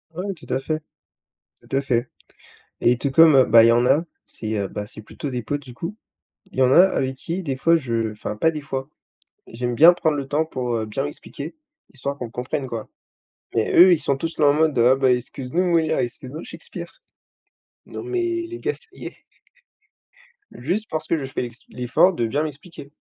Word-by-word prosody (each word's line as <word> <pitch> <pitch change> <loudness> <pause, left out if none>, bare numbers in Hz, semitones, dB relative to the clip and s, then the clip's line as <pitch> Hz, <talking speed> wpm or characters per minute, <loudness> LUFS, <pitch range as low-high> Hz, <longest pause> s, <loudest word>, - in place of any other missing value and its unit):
Ouais, 190 +3 -3
tout 160 - -12
à 130 - +1
fait. 155 +3 -2 0.8
Tout - - -5
à - - +2
fait 120 -4 0 0.7
et 120 +1 +4
tout 140 +2 -2
comme, 160 +1 +7
heu 130 - +7
bah 115 0 +7
il - - +7
y 115 - +6
en 120 +1 +3
a, 160 +6 +3 0.2
c'est, 110 -1 -5
heu 100 -2 -1
bah 105 +2 -5
c'est 105 - -9
plutôt 140 +6 -7
des 125 -1 -3
potes 145 +6 -3
du 125 -3 -11
coup. 170 - -6 0.6
Il - - -5
y - - +4
en 130 0 +5
a - - +9
avec 135 -8 0
qui 170 +7 -4
des 140 -7 -3
fois 165 +6 +3
je 115 -6 -2
enfin, 105 0 -6
pas 160 +10 +2
des 155 - -5
fois. 135 0 -5 0.6
J'aime 120 +1 -3
bien 165 +8 +8
prendre 160 -3 0
le 140 -2 -3
temps 150 +3 0
pour, 125 -5 -3
heu, 110 -1 -2
bien 120 +6 -3
m'expliquer, 145 +1 -7 0.4
histoire 140 +1 -4
qu'on 125 -4 -6
comprenne 125 +3 -3
quoi. 115 -3 -6 0.7
Mais 110 - +1
eux, 180 +1 +8
ils 165 - +1
sont 140 -2 0
tous 165 +3 -4
là 150 - +4
en 145 - +5
mode: 155 -1 +2
«Oh 125 +3 +5
bah 130 -2 +3
excuse-nous 125 +6 -2
Molière, 165 -3 +2
excuse-nous 130 +5 -5
Shakespeare». 485 +1 -9 0.8
Non, - - -8
mais 355 -2 -1
les 350 +1 -7
gars, 435 - -1
ça - - -8
y - - -11
est - - -10 1.4
juste 180 - -2
parce 155 0 -3
que - - +2
je 145 -4 -3
fais 135 - -4
l'ex 120 0 -6
l'effort 125 +10 +2
de 120 -8 -1
bien 145 +7 0
m'expliquer. 150 -1 -9
140 Hz, 215 wpm, -22 LUFS, 125-165 Hz, 1.4 s, a